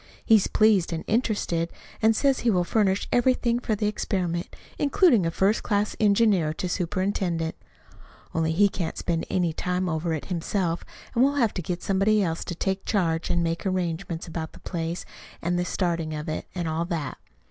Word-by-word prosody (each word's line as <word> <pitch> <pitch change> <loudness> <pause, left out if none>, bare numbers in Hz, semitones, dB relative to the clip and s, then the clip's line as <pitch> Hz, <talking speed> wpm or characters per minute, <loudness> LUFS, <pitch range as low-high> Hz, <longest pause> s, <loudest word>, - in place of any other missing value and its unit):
He's 220 -4 +5
pleased 210 -6 +3
and 165 -1 -3
interested, 205 -7 0 0.3
and 220 0 +4
says 275 +2 +2
he 240 - +1
will 180 -5 +3
furnish 195 +1 +1
everything 245 -1 +2
for 225 -3 -1
the 210 +1 -2
experiment, 180 -5 -2 0.2
including 280 - +4
a - - +1
first 195 +6 +2
class 205 0 0
engineer 200 -6 +3
to 180 - -3
superintend; 180 -2 -1 0.8
only 160 0 +1
he 200 +5 +5
can't 175 -4 -4
spend 165 -1 -1
any 175 -3 +1
time 180 +2 -1
over 165 0 -1
it 150 - -6
himself, 175 -1 -1 0.3
and 245 0 +4
we'll 280 +1 +3
have 235 -7 +2
to 185 - -3
get 175 +1 -4
somebody 200 +2 +3
else 165 -2 -2
to 175 - -4
take 190 +3 -2
charge 165 -5 0
and 175 -1 +1
make 165 0 -1
arrangements, 175 -2 -2
about 160 -1 -5
the - - -13
place, 170 -1 -4 0.3
and 175 +1 0
the 175 - 0
starting 170 -4 -1
of 150 0 -5
it, 155 - -4
and 175 -2 -2
all 160 +1 -1
that. 160 -7 -4
180 Hz, 180 wpm, -26 LUFS, 165-210 Hz, 0.8 s, He's